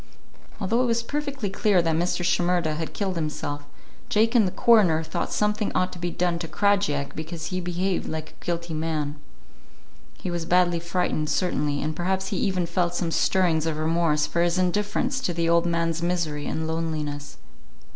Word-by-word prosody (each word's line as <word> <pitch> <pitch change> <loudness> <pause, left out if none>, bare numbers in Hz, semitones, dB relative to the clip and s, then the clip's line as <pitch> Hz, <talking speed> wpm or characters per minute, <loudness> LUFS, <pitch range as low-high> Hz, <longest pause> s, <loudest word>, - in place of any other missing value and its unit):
Although 225 +5 +1
it 255 - +2
was 230 0 +1
perfectly 280 -5 -3
clear 200 -2 +3
that 165 -2 +1
Mr. 175 +1 0
Shimerda 175 -2 +2
had 160 +1 -4
killed 195 -2 -1
himself, 145 -2 -3 0.4
Jake 225 +2 +3
and 225 -5 +5
the - - -2
coroner 200 -10 +4
thought 160 - -3
something 210 0 0
ought 185 0 +1
to 180 - -9
be 175 +1 -1
done 175 0 0
to 170 - -4
Krajiek 195 -5 +1
because 160 +1 -5
he 185 +1 -2
behaved 180 +1 -1
like 155 -1 -5
a - - -21
guilty 170 -1 -3
man. 155 -2 -2 1.0
He 180 - -4
was 170 -1 -3
badly 175 0 +3
frightened, 170 -3 -1
certainly, 150 -4 0
and 155 +1 -2
perhaps 190 +3 -1
he 195 - -2
even 185 -2 +1
felt 175 0 0
some 175 -2 -1
stirrings 165 -3 +2
of 155 -2 -1
remorse 155 -1 +2
for 170 - 0
his 175 +1 +2
indifference 210 +8 0
to 175 -9 -1
the 170 -1 +1
old 170 +1 +3
man's 170 -1 0
misery 170 -4 -1
and 160 - -2
loneliness. 155 -3 -3
175 Hz, 180 wpm, -25 LUFS, 160-185 Hz, 1.0 s, and